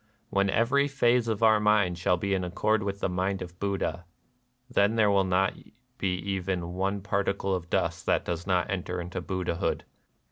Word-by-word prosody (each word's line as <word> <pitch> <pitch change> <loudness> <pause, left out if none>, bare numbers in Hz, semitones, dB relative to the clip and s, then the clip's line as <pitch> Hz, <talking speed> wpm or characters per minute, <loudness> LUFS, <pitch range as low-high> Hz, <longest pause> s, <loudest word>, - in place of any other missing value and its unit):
When 100 0 +2
every 130 +7 +2
phase 125 -4 +2
of 110 -1 -1
our 110 -1 +6
mind 105 -4 +2
shall 90 +1 +2
be 100 +2 -1
in 95 -1 0
accord 105 +5 +1
with 100 0 -4
the - - +1
mind 95 +1 -1
of 90 0 -12
Buddha,... 100 -3 -2 0.6
then 110 -3 +2
there 105 -2 +4
will 100 -1 +4
not 95 +1 +2 0.5
be 95 -2 0
even 90 -2 -3
one 95 +2 -1
particle 100 -1 -1
of 90 -2 -3
dust - - -1
that - - +2
does 85 +1 -4
not 90 -1 +1
enter 90 -1 -3
into 90 +1 -5
Buddhahood." 90 -3 -2
95 Hz, 180 wpm, -28 LUFS, 90-105 Hz, 0.6 s, our